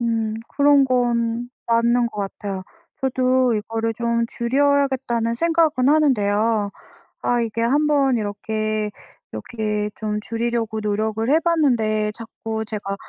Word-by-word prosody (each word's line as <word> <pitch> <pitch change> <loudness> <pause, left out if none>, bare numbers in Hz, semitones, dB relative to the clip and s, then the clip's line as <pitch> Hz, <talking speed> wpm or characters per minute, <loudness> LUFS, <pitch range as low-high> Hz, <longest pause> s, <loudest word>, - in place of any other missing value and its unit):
음, 225 -2 -1
그런 285 -1 +4
건 240 -2 0 0.2
맞는 235 +1 +3
것 210 -2 -6
같아요. 195 -1 -5 0.4
저도 255 -1 +2
이거를 225 +1 -2
좀 235 0 0
줄여야겠다는 265 -2 +1
생각은 320 -2 +2
하는데요. 220 -7 +2 0.5
아 245 -1 +1
이게 230 0 -2
한번 280 0 +2
이렇게 215 0 -2 0.4
이렇게 210 -3 -3
좀 210 -1 -3
줄이려고 230 0 -2
노력을 215 +1 -1
해 310 +3 +5
봤는데 235 -11 +1
자꾸 220 0 -5
제가 205 -2 -4
230 Hz, 255 characters per minute, -22 LUFS, 215-255 Hz, 0.5 s, 해